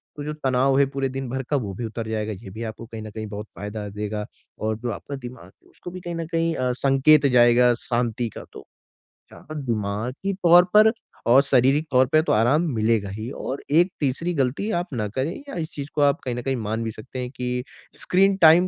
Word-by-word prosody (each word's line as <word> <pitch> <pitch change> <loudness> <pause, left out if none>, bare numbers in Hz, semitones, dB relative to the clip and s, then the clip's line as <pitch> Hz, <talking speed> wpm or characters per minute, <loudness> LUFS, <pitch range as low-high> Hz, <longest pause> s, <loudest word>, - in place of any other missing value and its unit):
तो 145 - -6
जो 150 +1 -4
तनाव 135 -2 +2
है 140 - +5
पूरे 135 0 -1
दिन 135 -1 -5
भर 130 +2 -3
का 150 - +1
वो 100 - -5
भी 115 +5 -5
उतर 110 0 -5
जाएगा, 110 -1 -2
ये 95 0 -10
भी 110 +5 -7
आपको 110 +1 -6
कहीं 115 -1 -8
न 110 - -7
कहीं 110 +1 -6
बहुत 105 +1 -7
फ़ायदा 105 +1 -6
देगा। 105 +1 -4 0.3
और 110 0 -1
जो 120 - -1
आपका 140 - -6
दिमाग 125 -7 -9
है, 95 - -22
उसको 175 - -10
भी 185 - -7
कहीं 175 -1 -5
न 165 0 -3
कहीं 165 0 +1
अ, 125 -1 0
संकेत 135 +3 +4
जाएगा 120 +1 +6
शांति 120 -1 -1
का, - - -7
तो - - -11 0.7
जहाँ 155 +1 -8
दिमागी 115 - -2
तौर 175 +1 +8
पर 215 +1 +7 0.4
और 130 +3 +8
शारीरिक 135 +3 +3
तौर 130 0 +5
पे 155 - +5
तो - - +2
आराम 120 +8 +3
मिलेगा 110 -2 +1
ही। 110 +4 -6
और 135 0 -5
एक 175 +5 +4
तीसरी 150 +5 -1
गलती 140 - -1
आप 175 - -4
ना 110 -4 -1
करें, 130 +9 -2 0.2
या - - -6
इस 160 -2 -4
चीज़ 140 -1 -6
को 150 - 0
आप 140 -1 +3
कहीं 125 -2 -2
न 125 - -3
कहीं 135 +2 -1
मान 110 -1 -3
भी 115 - -3
सकते 125 +4 -9
हैं 125 -1 -3
कि 125 0 -2 0.4
स्क्रीन 195 +2 +3
टाइम 165 +2 +7
125 Hz, 230 wpm, -23 LUFS, 110-150 Hz, 0.7 s, तौर